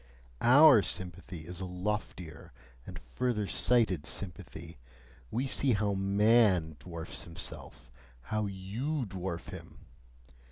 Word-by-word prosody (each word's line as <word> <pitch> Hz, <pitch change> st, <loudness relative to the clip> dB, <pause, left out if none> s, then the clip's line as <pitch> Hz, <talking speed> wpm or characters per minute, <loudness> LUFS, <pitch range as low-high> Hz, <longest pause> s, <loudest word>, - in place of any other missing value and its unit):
OUR 140 Hz, -1 st, +8 dB
sympathy 90 Hz, 0 st, -4 dB
is 90 Hz, +2 st, -7 dB
a -, -, -3 dB
loftier 90 Hz, -3 st, -5 dB, 0.4 s
and -, -, -8 dB
further 105 Hz, -, -2 dB
sighted 100 Hz, -8 st, +2 dB
sympathy: 85 Hz, -5 st, -6 dB, 0.5 s
we 125 Hz, -, -1 dB
see 135 Hz, 0 st, +2 dB
how 105 Hz, -1 st, +1 dB
MAN 100 Hz, -4 st, +3 dB
dwarfs 85 Hz, -1 st, -6 dB
himself, 65 Hz, -6 st, -9 dB, 0.3 s
how 110 Hz, -, -1 dB
YOU 115 Hz, +10 st, -3 dB
dwarf 95 Hz, -3 st, -5 dB
him! -, -, -11 dB
95 Hz, 110 wpm, -31 LUFS, 85-110 Hz, 0.5 s, OUR